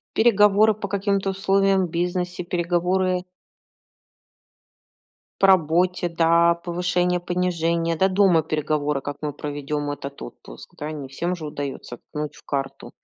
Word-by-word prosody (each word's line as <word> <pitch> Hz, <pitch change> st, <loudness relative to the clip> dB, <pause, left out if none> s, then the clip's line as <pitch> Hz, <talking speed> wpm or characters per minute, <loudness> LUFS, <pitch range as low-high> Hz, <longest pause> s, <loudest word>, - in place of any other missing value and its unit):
Переговоры 210 Hz, -1 st, +5 dB
по 205 Hz, -1 st, -6 dB
каким-то 200 Hz, 0 st, 0 dB
условиям 195 Hz, -1 st, +2 dB
в -, -, -11 dB
бизнесе, 180 Hz, +1 st, -2 dB
переговоры 180 Hz, +1 st, 0 dB, 2.2 s
по 195 Hz, -, +6 dB
работе, 180 Hz, 0 st, +3 dB
да, 170 Hz, 0 st, +3 dB
повышение-понижение. 175 Hz, -1 st, 0 dB
Да 190 Hz, +4 st, +3 dB
дома 185 Hz, -4 st, +4 dB
переговоры, 150 Hz, -2 st, -1 dB
как 145 Hz, +1 st, -6 dB
мы 150 Hz, -1 st, -2 dB
проведем 145 Hz, 0 st, -4 dB
этот 140 Hz, -1 st, -7 dB
отпуск, -, -, -12 dB
да. 150 Hz, +1 st, -4 dB
Не 145 Hz, -3 st, -6 dB
всем 170 Hz, +7 st, -3 dB
же 160 Hz, -3 st, -7 dB
удается 140 Hz, -4 st, -6 dB
ткнуть 150 Hz, 0 st, -6 dB
в -, -, -17 dB
карту, 135 Hz, -1 st, -4 dB
175 Hz, 125 wpm, -23 LUFS, 150-185 Hz, 2.2 s, по